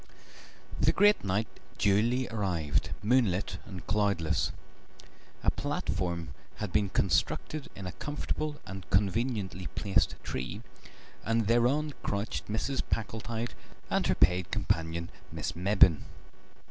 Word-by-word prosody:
The - - +5
great 205 +1 +5
night 100 +3 +1 0.3
duly 115 +6 +3
arrived, 90 - 0
moonlit 105 -5 +2
and 95 -3 -8
cloudless. 100 -6 +1 0.9
A - - +4
platform 85 -2 -2 0.3
had 105 -4 -5
been 105 -2 +3
constructed 115 +10 0
in 95 - -7
a 90 - -3
comfortable 150 - -3
and 95 -1 -8
conveniently 100 -1 0
placed 100 -2 +2
tree, 65 -1 -4 0.6
and 115 0 +1
thereon 125 +7 +3
crouched 100 +2 -2
Mrs. 120 +5 -1
Packletide 115 +2 -2 0.4
and - - +2
her - - +3
paid 90 0 +3
companion, 85 +1 -1 0.2
Miss - - -3
Mebbin. 90 -3 +5
100 Hz, 110 wpm, -30 LUFS, 90-115 Hz, 0.9 s, The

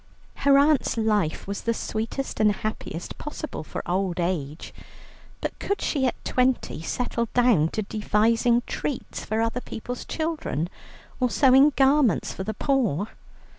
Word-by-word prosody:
Her 280 0 +5
aunt's 285 -3 +3
life 210 -8 +1
was 200 +1 -4
the 230 0 0
sweetest 225 +6 -3
and 215 -1 +5
happiest 205 -5 -5
possible 300 - -6
for - - -6
old 185 -1 -1
age, 165 -4 -3 0.7
but - - -4
could 400 - -1
she 270 -4 +1
at - - -4
twenty 255 -10 +1
settle 235 +5 -2
down 240 -11 +4
to 215 +6 -3
devising 225 +3 +2
treats 280 - -4
for 220 +1 -1
other 230 +2 -1
people's 245 +2 -6
children, 315 - -2 0.5
or 250 -1 +2
sewing 270 +3 +6
garments 270 -3 +3
for 190 - -5
the 220 +2 -4
poor? 225 - +1
230 Hz, 140 wpm, -25 LUFS, 200-265 Hz, 0.7 s, sewing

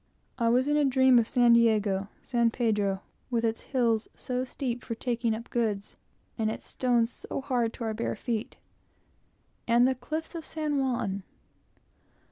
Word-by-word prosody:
I 230 -1 +3
was 250 +3 +3
in 295 0 +2
a 300 - +4
dream 260 -2 +5
of 225 - 0
San 240 -1 +5
Diego, 210 -4 +3 0.2
San 235 -2 +2
Pedro 210 -5 0 0.3
with 235 -2 0
its 225 0 -1
hills 230 -4 +1
so 250 0 -2
steep 250 -2 -4
for 230 - -4
taking 235 -1 -1
up 230 +2 -9
goods, 215 -4 -1 0.4
and 220 -1 +1
its 220 - -6
stones 240 -2 +1
so - - -6
hard 250 -4 0
to 240 - -7
our 220 -1 -1
bare 230 +2 -2
feet 230 -2 -3 1.1
and 240 +1 +5
the 260 - +2
cliffs 315 +6 -5
of 335 -2 -5
San 305 -2 -2
Juan! 230 -7 -1
235 Hz, 165 wpm, -28 LUFS, 225-255 Hz, 1.1 s, dream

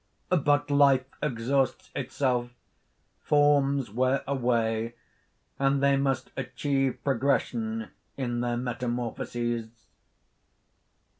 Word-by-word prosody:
But 145 -4 +2
life 140 -2 +5 0.2
exhausts 135 0 0
itself; 125 -2 -1 0.7
forms 140 -4 +3
wear 130 +4 +1
away; 115 -3 0 0.6
and 135 0 +2
they 140 0 +5
must 135 -1 0
achieve 135 0 -1
progression 220 - 0 0.3
in 120 -3 -2
their 120 -1 -1
metamorphoses." 120 -1 -3
135 Hz, 80 wpm, -28 LUFS, 120-140 Hz, 0.7 s, life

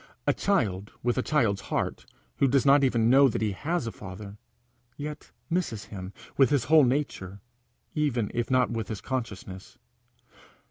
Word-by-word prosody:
A - - +3
child 105 - 0
with 120 +1 +1
a - - +3
child's 115 -10 +1
heart - - -2 0.3
who 140 - +4
does 135 +1 +2
not 140 +1 +6
even 120 -4 +3
know 135 +3 +7
that 110 - -2
he 105 - +1
has 160 - -2
a 115 - -3
father, 100 +1 -9 0.6
yet 150 +1 -7 0.2
misses 165 - -1
him 95 -1 -6 0.3
with 135 - +5
his 140 -5 +2
whole 155 +2 +6
nature, 120 -8 -2 0.5
even 130 -8 0
if 120 -1 -1
not 130 -1 +3
with 115 -2 -3
his 110 -4 -5
consciousness. 100 -6 -6
120 Hz, 165 wpm, -27 LUFS, 105-140 Hz, 0.6 s, know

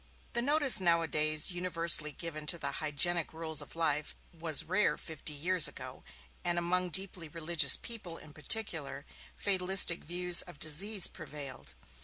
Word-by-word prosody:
The 235 - -1
notice 285 -2 +4
nowadays 160 -2 0
universally 170 -3 +2
given 155 0 -7
to 170 - +1
the - - -4
hygienic 160 +3 0
rules 160 -2 -2
of 145 - -12
life 150 -3 -2 0.2
was 165 -2 -1
rare 190 +5 0
fifty 160 -2 -5
years 175 +3 +2
ago - - -10 0.4
and 175 0 -1
among 180 +1 -1
deeply 180 0 -3
religious 165 +1 +1
people, 195 -8 -5
in 150 -1 -15
particular, 150 -4 -1 0.3
fatalistic 190 -3 +5
views 175 +1 +4
of - - -12
disease 185 +7 +1
prevailed. 150 -5 -8
170 Hz, 140 wpm, -30 LUFS, 155-180 Hz, 0.4 s, fatalistic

